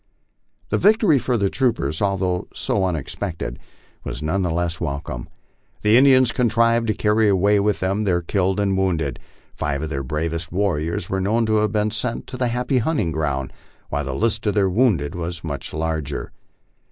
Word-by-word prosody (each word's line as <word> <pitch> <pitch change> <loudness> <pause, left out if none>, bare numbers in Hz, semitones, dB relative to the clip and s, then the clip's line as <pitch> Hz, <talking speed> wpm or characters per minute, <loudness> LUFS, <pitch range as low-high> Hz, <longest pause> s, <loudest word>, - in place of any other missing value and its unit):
This - - +1
victory 210 - +5
for 125 0 0
the 100 -2 +2
troopers, 115 - 0
although 95 -3 0
so 100 -2 0
unexpected, 85 +2 -4 0.4
was - - -5
none 90 +6 0
the 90 - 0
less 85 0 -1
welcome. 70 -6 -4 0.5
The 105 +1 +5
Indians 130 -1 +6
contrived 115 -1 +2
to 110 - +1
carry 105 0 +3
away 100 +2 +3
with 105 0 0
them 95 +3 0
their 90 -4 +1
killed 95 +2 0
and 100 -1 +1
wounded. 85 -8 0 0.3
Five 70 +1 -2
of 80 - -4
their 70 -2 -2
bravest 80 +4 -3
warriors 85 -3 -1
were 95 0 -1
known 110 +4 +1
to 110 0 +2
have 105 0 +1
been 105 0 +1
sent 115 +1 -3
to 130 - -6
the 125 -1 +1
happy 125 +2 0
hunting 120 - 0
ground, 70 -4 -2 0.4
while - - -1
the - - -3
list 115 -1 0
of 105 - +1
their 100 -2 +3
wounded 90 - +2
was 85 -1 -5
much 70 -4 -5
larger. 80 -2 -3
95 Hz, 175 wpm, -22 LUFS, 80-110 Hz, 0.5 s, Indians